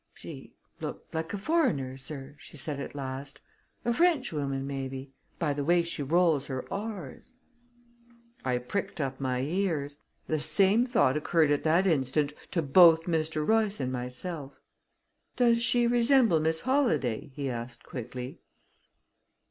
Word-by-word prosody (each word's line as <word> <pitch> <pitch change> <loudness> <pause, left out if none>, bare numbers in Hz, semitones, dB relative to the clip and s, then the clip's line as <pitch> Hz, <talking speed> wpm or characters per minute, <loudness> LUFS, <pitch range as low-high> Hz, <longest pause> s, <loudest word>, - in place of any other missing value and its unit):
"She - - -10 0.2
looked - - -7
like 160 0 -3
a 205 - -3
foreigner, 200 - 0
sir," 135 +1 -6
she 150 - -11
said 140 +1 -3
at 140 - -6
last. 135 +1 -6 0.5
"A 235 - +2
Frenchwoman, 160 - +1
maybe, 135 -1 -5 0.3
by 150 -4 0
the 145 0 -3
way 170 +3 +3
she 170 -2 -5
rolls 160 -1 +2
her 130 -2 -4
r's." 205 - -6 1.1
I 125 -1 +1
pricked 145 +10 -4
up 135 -2 -2
my 130 -2 -1
ears. 150 -2 -1 0.3
The 155 - -1
same 195 - +4
thought 220 - +3
occurred 155 0 +2
at 145 - +2
that 165 +4 +3
instant 145 -3 +1 0.2
to 170 -3 0
both 165 +2 +7
Mr. 160 -2 -1
Royce 220 -2 +2
and 130 -1 -2
myself. 135 +4 -5 0.8
"Does 235 -2 +3
she 240 0 +4
resemble 240 - +4
Miss 160 +1 +1
Holladay?" 255 - +1
he 140 -1 -3
asked 120 -1 -5
quickly. 125 +1 -7
155 Hz, 140 wpm, -29 LUFS, 135-195 Hz, 1.1 s, both